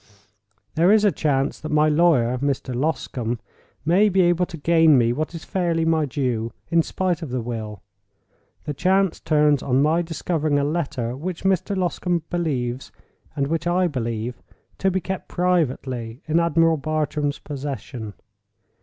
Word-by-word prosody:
There 170 +4 +4
is 215 0 +5
a 205 - +5
chance 140 -5 0
that 155 - -6
my 150 0 +4
lawyer, 150 -6 +3
Mr. 135 -2 -2
Loscombe, 125 -4 -2 0.5
may 190 +6 +4
be 190 -1 +3
able 175 0 +2
to 165 - -8
gain 160 -1 +5
me 120 -1 +3
what 155 +5 -3
is 165 - -8
fairly 170 -3 0
my 160 -2 +2
due, 120 -4 -2 0.2
in 170 0 +5
spite 180 0 -1
of 160 - -5
the 125 +1 -2
will. 110 -4 -5 0.8
The 150 - -4
chance 190 +4 +1
turns 150 -2 +3
on 135 +1 +2
my 160 +3 +3
discovering 160 -2 -1
a 140 - +1
letter 140 -6 -2
which 170 +6 -5
Mr. 190 +1 +1
Loscombe 175 -2 -1
believes, 135 -8 -2 0.4
and 140 -2 0
which 165 +3 -2
I 180 +1 +2
believe, 120 -5 -3 0.4
to 195 - +2
be 190 0 -1
kept 190 +1 -5
privately 130 -9 -1
in 160 +2 +2
Admiral 165 -1 +3
Bartram's 150 -1 -1
possession. 135 -6 -6
155 Hz, 155 wpm, -23 LUFS, 130-175 Hz, 0.8 s, is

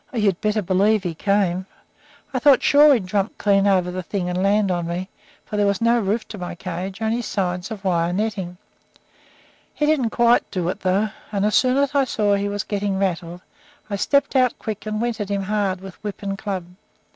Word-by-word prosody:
Oh, 250 - -6
you'd 200 -5 +1
better 215 0 0
believe 195 +3 +2
he 175 -3 -2
came! 190 0 0 0.7
I - - 0
thought 280 -3 +5
sure 295 +1 +6
he'd 215 -6 -2
jump 200 +2 -1
clean 200 -1 +3
over 185 -2 +2
the 185 +1 -4
thing 180 0 -3
and 180 +1 -1
land 200 0 +2
on 175 -1 -1
me; 180 +3 -4 0.4
for 210 - -5
there 205 -1 +3
was 200 -1 +1
no 235 +1 +3
roof 215 +2 -1
to 210 - -8
my 175 -1 -5
cage 185 +4 -5
only 225 +2 0
sides 180 -4 -2
of 215 -3 -7
wire 170 -2 +1
netting. 190 -3 -3 1.2
He 300 - +1
didn't 295 -6 +2
quite 235 +1 +3
do 180 -3 -2
it, - - -4
though; 195 +3 +1 0.2
and 200 -1 0
as 210 - +1
soon 255 0 +3
as 280 0 +1
I 280 -2 +3
saw 210 -4 +1
he 200 0 0
was 205 -1 -2
getting 200 -1 -2
rattled 175 -2 -2 0.5
I - - 0
stepped 280 +8 +1
out 255 -2 +3
quick 215 -1 -6
and 215 0 -2
went 235 -1 -2
at 205 - -4
him 200 -1 -1
hard 195 -2 -1
with 190 +1 -11
whip 205 -1 -6
and 195 0 -2
club. 195 -3 -4
200 Hz, 215 wpm, -22 LUFS, 185-220 Hz, 1.2 s, sure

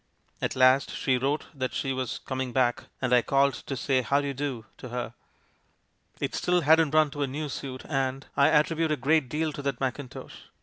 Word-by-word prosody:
At - - -1
last 130 +1 +4
she 130 -2 +1
wrote 140 +4 0
that 130 -3 -3
she 135 -1 -1
was 130 -2 -3
com 130 -1 -3
ing 125 -2 -4
back 120 -2 +1
— - - -40
and 125 -1 +2
I 125 - +6
called 140 +2 +2
to 135 - -6
say 130 +1 +1
'how 140 +4 +2
do 145 - -2
you 140 - -2
do' 135 -4 -4
to 130 - -9
her. 120 -1 -4 1.1
It - - -2
still 180 0 +1
hadn't 160 0 +4
run 155 -2 +4
to 145 - -5
a 140 - +1
new 150 +3 -4
suit, 130 -1 -6
and 135 -2 -1
— - - -39
I 140 - +5
attribute 160 +1 +2
a 150 - +1
great 140 0 +2
deal 155 +2 -1
to 145 - -6
that 140 -3 -2
mackintosh 130 0 -5
135 Hz, 225 wpm, -27 LUFS, 130-145 Hz, 1.1 s, I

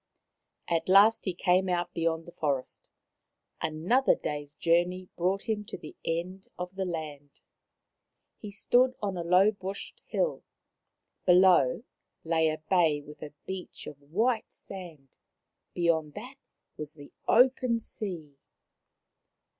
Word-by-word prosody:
At 165 0 0
last 205 +4 +6
he 185 -3 -2
came 185 +1 +2
out 175 0 -1
beyond 165 -1 -1
the 175 - -11
forest. 140 -6 -3 0.7
Another 180 +13 +2
day's 145 -1 -5
journey 175 +2 +1
brought 185 +5 -1
him 215 -2 -1
to - - -7
the 155 - -11
end 180 +4 -3
of 180 +1 -5
the 190 0 -2
land. 150 -5 -6 1.0
He 210 - -7
stood 250 +5 +3
on 200 -2 -2
a 175 - -3
low 180 +5 +5
bushed 195 -1 -7
hill; - - -1 0.8
below 180 - +5 0.4
lay 160 -1 +2
a 155 - +1
little 155 0 -9
bay 165 -6 +3
with 150 +1 -13
a 145 - -7
beach 190 -1 -7
of 145 -1 -10
white 220 - 0
sand; 170 -8 -10 0.7
beyond 160 -4 +1
that 265 +2 -9 0.4
was 150 0 -6
the 145 -2 -13
open 250 0 +4
sea. 175 - -7
175 Hz, 130 wpm, -29 LUFS, 155-195 Hz, 1.0 s, last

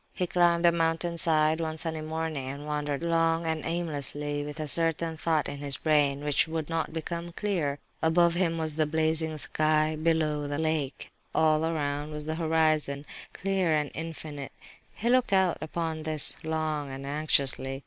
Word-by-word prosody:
He 180 - 0
climbed 175 -1 +3
the 170 - +7
mountain 165 0 0
side, 155 0 +3
one 160 -1 -3
sunny 160 -1 -2
morning, 155 -3 -3
and 140 +2 -6
wandered 150 0 -2
long 165 0 +2
and 160 -1 -1
aimlessly 145 -3 -2
with 150 +2 -7
a 155 - -2
certain 165 +2 0
thought 160 -1 0
in 140 0 -6
his 140 -1 0
brain, 145 -2 +2
which 150 +2 +2
would 160 -1 -3
not 165 -1 -1
become 170 +2 -4
clear. 170 -9 -1 0.2
Above 170 +1 +4
him 170 -2 +1
was 160 -1 -1
the 155 -1 +3
blazing 160 0 0
sky, 155 +1 +2
below, 155 -2 +1
the 145 0 -2
lake; 155 -3 -2 0.2
all 155 -1 +3
around 145 -2 -2
was 150 -1 -5
the 155 - -2
horizon, 155 -3 +1 0.3
clear 190 -4 0
and 150 -1 -1
infinite. 155 -3 -6 0.4
He 230 - -3
looked 250 -3 +3
out 190 -2 +3
upon 160 0 -3
this, 155 -2 +2
long 155 -2 -2
and 135 +1 -7
anxiously. 140 -2 0
155 Hz, 170 wpm, -28 LUFS, 150-165 Hz, 0.4 s, the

